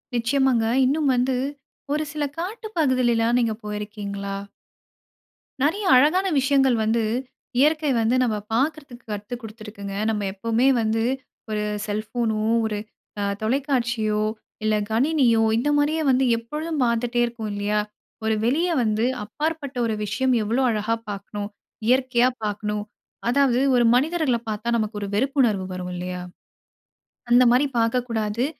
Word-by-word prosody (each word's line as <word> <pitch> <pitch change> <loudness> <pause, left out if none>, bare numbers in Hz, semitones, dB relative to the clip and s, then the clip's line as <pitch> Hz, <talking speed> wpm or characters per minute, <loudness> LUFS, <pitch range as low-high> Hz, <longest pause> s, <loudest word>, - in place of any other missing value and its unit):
நிச்சயமாகங்க. 240 0 +2 0.2
இன்னும் 290 +2 +2
வந்து 250 +1 +1 0.6
ஒரு 305 +1 0
சில 300 0 -2 0.2
காட்டு 435 +6 -4
பகுதில 255 -6 +3
எல்லா 225 0 +2
நீங்க 230 -2 +1
போயிருக்கீங்களா? 205 -1 -5 1.3
நெறைய 380 +8 +1
அழகான 310 +9 +4
விஷயங்கள் 270 -1 +3
வந்து, 225 +1 +1 0.6
இயற்கை 305 +1 +3
வந்து 225 +3 +2
நம்ம 230 -3 0 0.2
பாக்குறதுக்கு 275 -1 -2
கத்து 210 +4 -4
கொடுத்து 220 0 -10
இருக்குங்க. 200 -2 -7
நம்ம 215 -2 -1
எப்பவுமே 230 +5 +1
வந்து, 225 0 0 0.5
ஒரு 210 -1 -1 0.2
செல்போனோ, 215 +1 -1 0.2
ஒரு 215 -1 -2 0.4
அ - - 0 0.2
தொலைக்காட்சியோ 235 -4 0 0.4
இல்ல 215 0 +2
கணினியோ 240 -1 +3
இந்த 245 +6 +1
மாரியே 300 +2 +1
வந்து 260 0 +3
எப்பொழுதும் 300 +6 -3
பார்த்துட்டே 240 0 0
இருக்கோம் 235 -2 -5
இல்லையா? 205 +1 0 0.4
ஒரு 220 0 +1
வெளிய 300 +10 +2
வந்து 220 0 +1 0.2
அப்பாற்பட்ட 295 +4 -3
ஒரு 225 - 0
விஷயம் 230 +6 0
எவ்வளோ 230 +5 0
அழகா 220 0 0
பார்க்கணும். 205 0 -5 0.4
இயற்கையா 255 -1 +3 0.2
பார்க்கணும். 210 0 -2 0.5
அதாவது 255 -1 +3 0.2
ஒரு 245 - +4
மனிதர்கள 300 -1 +2
பார்த்தா, 215 +2 -2
நமக்கு 215 -1 -2
ஒரு 200 - -3
வெறுப்புணர்வு 240 -5 +2
வரும் 180 0 -5
இல்லையா? 180 0 -4 1.1
அந்த 245 +1 +6
மாரி 255 +4 +4
பார்க்கக்கூடாது. 230 -1 0
235 Hz, 130 wpm, -23 LUFS, 215-270 Hz, 1.3 s, அந்த